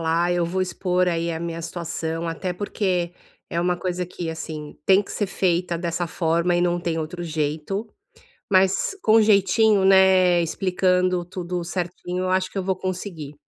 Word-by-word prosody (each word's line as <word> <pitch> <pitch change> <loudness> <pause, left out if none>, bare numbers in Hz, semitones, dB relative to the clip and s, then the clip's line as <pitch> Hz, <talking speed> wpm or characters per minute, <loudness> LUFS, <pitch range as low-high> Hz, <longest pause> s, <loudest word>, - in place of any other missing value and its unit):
lá, 165 +2 +1
eu 175 -1 +1
vou 185 +3 -2
expor, 180 0 0
aí, 170 -1 0
a 160 - -3
minha 165 0 -5
situação, 165 -1 -4
até 165 +2 -3
porque 180 -2 -1 0.4
é 170 - -1
uma 180 0 +1
coisa 180 0 -2
que, 175 -1 -6
assim, 155 -2 -6
tem 190 0 +5
que 205 - -7
ser 205 - -1
feita 175 -2 0
dessa 170 0 -2
forma 170 +1 +1
e - - +2
não 175 0 +1
tem 165 -1 -2
outro 165 +3 -5
jeito. 160 +6 -2 0.7
Mas 190 - +3
com 220 +1 +5
jeitinho, 210 0 +4
né, 190 -2 +5
explicando 180 +1 +1
tudo 180 0 -4
certinho, 180 +1 -3
eu - - -1
acho 185 0 +1
que - - -7
eu 190 - -1
vou 190 0 0
conseguir. 180 -5 -5
180 Hz, 175 wpm, -23 LUFS, 170-185 Hz, 0.7 s, tem